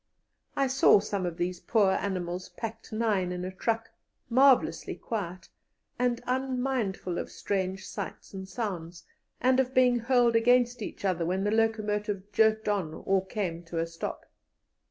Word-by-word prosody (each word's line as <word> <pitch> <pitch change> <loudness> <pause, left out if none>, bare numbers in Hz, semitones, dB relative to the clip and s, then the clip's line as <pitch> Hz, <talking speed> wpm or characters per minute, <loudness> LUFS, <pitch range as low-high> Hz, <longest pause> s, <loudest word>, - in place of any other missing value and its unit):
I 275 - +2
saw 265 -5 +5
some 200 -2 -2
of 170 -1 -5
these 180 0 -2
poor 205 -2 +3
animals 180 -2 -2
packed 225 -1 -7
nine 215 -5 0
in 180 0 -4
a 185 - -4
truck, 225 +4 -2 0.4
marvellously 240 - +4
quiet, 185 -5 -5 0.5
and 245 -1 +1
unmindful 250 -8 -1
of - - -5
strange 190 -1 -2
sights 200 0 -7
and 190 -1 -7
sounds, 180 -8 -5 0.4
and 255 +1 +4
of 260 0 0
being 250 -1 +5
hurled 240 0 +3
against 245 +1 +3
each 200 - -6
other 180 -3 +1
when 185 +3 0
the 205 - +1
locomotive 210 -2 0
jerked 220 0 +3
on 190 -7 -1
or 195 -1 +1
came 185 -5 -3
to 170 0 -6
a 165 - +1
stop. 165 0 -6
205 Hz, 155 wpm, -29 LUFS, 185-235 Hz, 0.5 s, saw